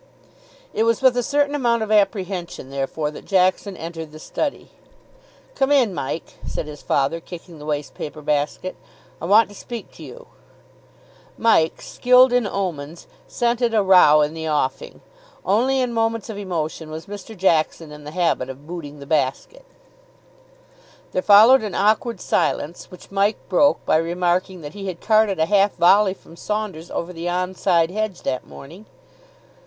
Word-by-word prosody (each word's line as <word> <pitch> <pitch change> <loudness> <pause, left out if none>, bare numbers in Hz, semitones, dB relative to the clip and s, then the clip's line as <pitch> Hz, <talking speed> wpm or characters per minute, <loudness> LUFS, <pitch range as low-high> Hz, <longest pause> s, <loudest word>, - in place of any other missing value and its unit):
It - - -1
was 230 +3 +1
with 260 -2 +5
a 245 - +1
certain 285 +3 0
amount 235 -5 +1
of 215 - -5
apprehension, 195 - 0
therefore, 140 +2 -3
that - - -11
Jackson 185 0 +1
entered 165 -1 -7
the 155 - -11
study. 285 - -4 0.8
"Come 270 - 0
in, 255 -8 +3
Mike," 160 +1 -5
said - - -4
his 150 -1 -10
father, 140 +4 0
kicking 170 -1 -11
the 150 - -10
waste 145 -2 -3
paper 150 0 -8
basket; 150 +5 -1 0.5
"I - - -4
want 210 +5 +5
to - - -13
speak 235 +3 -8
to - - -13
you." - - -11 1.1
Mike, 190 -8 +2
skilled 250 0 +4
in 245 -4 +2
omens, 170 -5 -4 0.2
scented 235 -1 0
a 210 - +3
row 180 -6 +6
in 150 +1 0
the 160 -1 -4
offing. 145 -3 -2 0.4
Only 250 +7 +2
in 250 -2 -1
moments 225 -1 -1
of 205 - -8
emotion 165 -4 -4
was 160 +1 -7
Mr. 205 +1 -9
Jackson 165 -3 +1
in 150 0 -11
the 150 - -8
habit 165 -6 0
of 135 +2 -10
booting 155 -3 -8
the - - -8
basket. 150 - -2 1.5
There 185 - -1
followed 220 +7 +7
an 210 -3 -5
awkward 215 +1 +1
silence, 165 -1 -1
which 180 - -14
Mike 200 +2 +1
broke 285 +10 +3
by - - +3
remarking 175 +2 -1
that 145 0 -8
he 200 -1 -7
had 180 -2 -5
carted 215 -3 +2
a 160 - +2
half 200 +2 +2
volley 190 +3 +4
from 165 - -17
Saunders 210 -6 -4
over 175 +2 -4
the 170 +1 -4
on 180 +1 -2
side 170 -2 +2
hedge 215 -2 -3
that 130 - -3
morning. 170 +10 -12
185 Hz, 165 wpm, -21 LUFS, 160-215 Hz, 1.5 s, followed